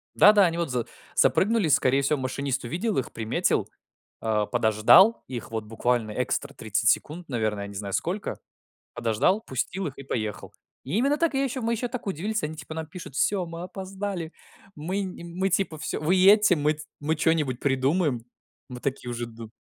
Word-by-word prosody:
Да-да, 205 -1 +7
они 170 -1 0
вот 170 -3 -1
за 120 -2 -1 0.3
запрыгнули, 215 -3 +3
скорее 135 -2 +3
всего, 140 +2 +1
машинист 130 +1 -2
увидел 180 - -2
их, 130 - -1
приметил, 110 -1 0 0.5
а 105 -2 0
подождал 115 - +5
их 125 -3 -6
вот 110 -1 -3
буквально 115 0 -1
экстра - - -2
30 110 0 0
секунд, 165 +2 -2
наверное, 110 -5 -1
я - - -7
не 100 - -10
знаю 100 0 -5
сколько. 190 +4 -2 0.6
Подождал, 120 - +1
пустил 185 - -3
их 140 - -6
и - - -7
поехал. 110 -6 -4 0.3
Именно 245 - +1
так. 330 -2 +1
Я 270 +1 +2
ещё 260 -1 -3
мы 230 +1 0
ещё 235 +2 -1
так 240 -2 -6
удивились, 205 +4 -2
они, 155 +1 -3
типа, 155 - -9
нам 160 0 -4
пишут: 160 -3 -10
"Всё, 190 +6 +1
мы 165 0 -7
опоздали, 190 -2 -5 0.4
мы 180 +7 -3
не 185 -3 -7
мы". 180 +3 -1
Типа: 180 -3 0
"Всё, - - -3
вы 155 +4 +2
едьте, 200 0 +6
мы 150 +1 +1
т 150 - -12 0.2
мы 155 +2 0
чё-нибудь 155 -6 +1
придумаем". 135 -1 +1 0.4
Мы 125 -2 -8
такие 130 -2 -3
уже 120 0 -3
ду 115 -1 -10
155 Hz, 185 wpm, -26 LUFS, 120-190 Hz, 0.6 s, Да-да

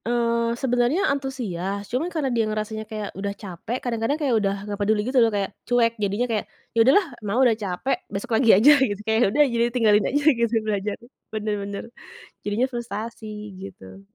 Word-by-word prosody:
Eee, 235 0 +1
sebenarnya 245 +6 +1
antusias 205 -8 -4
cuma 275 +9 -1
karena 300 -7 -1
dia 225 -2 +1
ngerasanya 215 0 -3
kayak 215 -2 -4
udah 200 +1 -4
capek 200 +5 -5
kadang-kadang 235 +3 -1
kayak 275 -4 +1
udah 195 -2 0
nggak 205 -1 -5
peduli 210 +1 +2
gitu 255 0 +3
loh, 230 - +5
kayak 200 -2 -1 0.2
cuek 235 -1 +3
jadinya 205 +5 0
kayak, 215 -2 -1 0.3
“Ya - - -8
udahlah 275 - +5 0.2
Mama 210 +3 -1
udah 240 - +5
capek 190 +7 -1 0.2
besok 205 +6 -5
lagi 230 +1 +3
aja,” 250 +9 +7
gitu 210 -7 +1
kayak 220 0 +2
ya - - +5
udah 290 +8 +4
jadi 235 0 +2
tinggalin 215 -4 +3
aja 290 +2 0 0.2
gitu 235 0 +1
belajar 205 -1 -2 0.4
bener 215 -1 -2
bener. 200 0 -5 0.6
Jadinya 210 +5 +1
frustrasi 230 -1 -5 0.3
gitu. 95 - -11
225 Hz, 180 wpm, -24 LUFS, 205-245 Hz, 0.6 s, aja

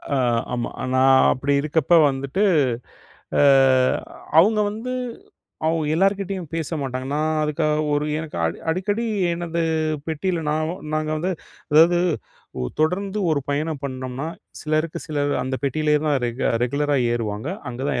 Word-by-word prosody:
அ - - +2 0.4
ஆமா. 120 -1 -2 0.3
நான் 130 0 +5
அப்படி 140 +2 -1
இருக்கப்போ 160 +2 +3
வந்துட்டு, 140 +9 -1 1.0
அ - - +5 1.0
அவங்க 210 +5 +5
வந்து 230 +4 -5 0.7
அவங்க 160 -1 +1
எல்லார்கிட்டேயும் 195 -2 0
பேச 165 0 -2
மாட்டாங்க. 130 0 -4
நான் 155 +1 0
அதுக்காக 150 0 0
ஒரு 145 +1 0
எனக்க 160 - -7
அடு 85 - -3
அடிக்கடி 205 +6 -1 0.3
எனது 170 0 -2 0.5
பெட்டியில 165 +2 -1
நாவும் 155 +4 -2
நாங்க 155 0 -1
வந்து 185 +4 -1 0.4
அதாவது, 170 +3 +6 0.6
ஓ - - -2 0.2
தொடர்ந்து 195 +6 0
ஒரு 145 - +1
பயணம் 150 0 -2
பண்ணோம்னா, 130 +2 -4 0.3
சிலருக்கு 155 +1 -1
சிலர், 145 -2 -1
அந்த 130 +1 -3
பெட்டியிலேயே 150 +2 +1
தான் 145 -2 +2
ரெகு 120 +2 -3 0.2
ரெகுலரா 145 +3 0 0.2
ஏறுவாங்க. 110 +3 -3 0.2
அங்கே 125 +3 -5
தான் - - -1
155 Hz, 135 wpm, -22 LUFS, 140-170 Hz, 1.0 s, அதாவது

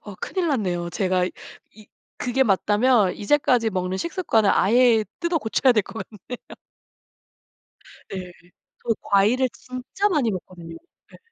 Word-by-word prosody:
어 205 -2 -9
큰일 365 -3 -2
났네요. 180 -10 -1
제가 185 0 0 0.5
이 215 -1 -16 0.3
그게 255 +2 +1
맞다면 210 0 +2
이제까지 240 0 +2
먹는 185 -1 -2
식습관을 335 - +1
아예 230 +1 +4 0.2
뜯어 340 -1 0
고쳐야 255 +1 +2
될 215 -3 +2
것 225 - -7 0.2
같네요. 250 - -4 1.7
네. 185 -2 -6 0.5
저 230 -2 0
과일을 220 +7 +3
진짜 255 +11 -3
많이 290 - +1
먹거든요. 175 -3 -8 0.4
예. - - -15
220 Hz, 265 characters per minute, -23 LUFS, 190-255 Hz, 1.7 s, 아예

